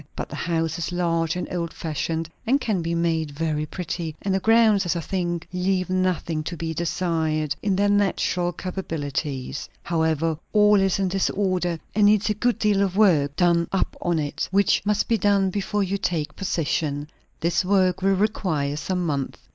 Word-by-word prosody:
But - - -5
the - - -7
house 165 -1 -1
is 170 - -3
large 165 -2 0
and 180 - -3
old 170 -2 -2
fashioned, 160 +1 -3 0.2
and 270 +4 +4
can 215 -9 -1
be 165 +1 -2
made 165 -2 0
very 155 +1 -2
pretty; 165 -2 -4
and 195 - 0
the 190 - +2
grounds, 220 -1 +4
as 175 -1 -1
I - - -1
think, 175 -1 -3
leave 185 0 0
nothing 185 -4 0
to 170 - -4
be 165 0 -3
desired, 160 -3 -1
in 200 -2 +1
their 200 +2 +2
natural 195 -3 +1
capabilities. 145 -8 -4
However, 160 -1 0
all 210 -1 +5
is 195 -1 +2
in 195 -2 0
disorder, 185 -2 0 0.2
and 205 0 +4
needs 210 0 +3
a - - +2
good 240 +3 0
deal 205 -2 +2
of 195 -1 0
work 155 -9 +4
done 170 -1 +3
up 195 - 0
on 175 -1 +1
it; 150 0 -2
which 200 +1 +3
must 210 0 +1
be 230 -2 +1
done 195 -1 +2
before 205 +1 -1
you 195 +1 -2
take 165 -6 -2
possession. 150 -5 -1 0.3
This 170 +2 +1
work 185 -1 +2
will 195 +1 +3
require 170 -8 0
some 180 +3 -2
months. 140 -4 -2
175 Hz, 180 wpm, -24 LUFS, 160-195 Hz, 0.3 s, all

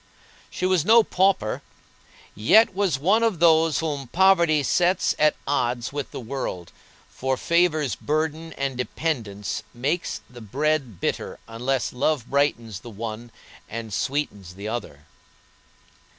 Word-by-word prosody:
She - - -3
was 185 -4 +3
no 225 +5 +6
pauper, 185 - +1 0.7
yet 195 - +5
was 190 -7 +1
one 195 +11 +3
of 225 -5 +1
those 160 -2 +4
whom 145 -5 -3
poverty 170 -2 +4
sets 180 +7 +2
at 150 0 +4
odds 125 -3 -1
with 145 -2 -4
the - - -7
world, 115 -8 -5 0.4
for 130 0 -2
favors 160 - +2
burden 155 - -2
and 135 -1 -2
dependence 115 - -3
makes 145 +8 -2
the 125 -1 -13
bread 135 - -1
bitter - - -2
unless 125 +3 -2
love 125 -1 0
brightens 120 -8 0
the 120 - -11
one 115 +2 -6 0.4
and 115 -1 -6
sweetens 100 -9 -3
the 100 +2 -7
other. 75 -11 -5
140 Hz, 130 wpm, -24 LUFS, 115-165 Hz, 0.7 s, no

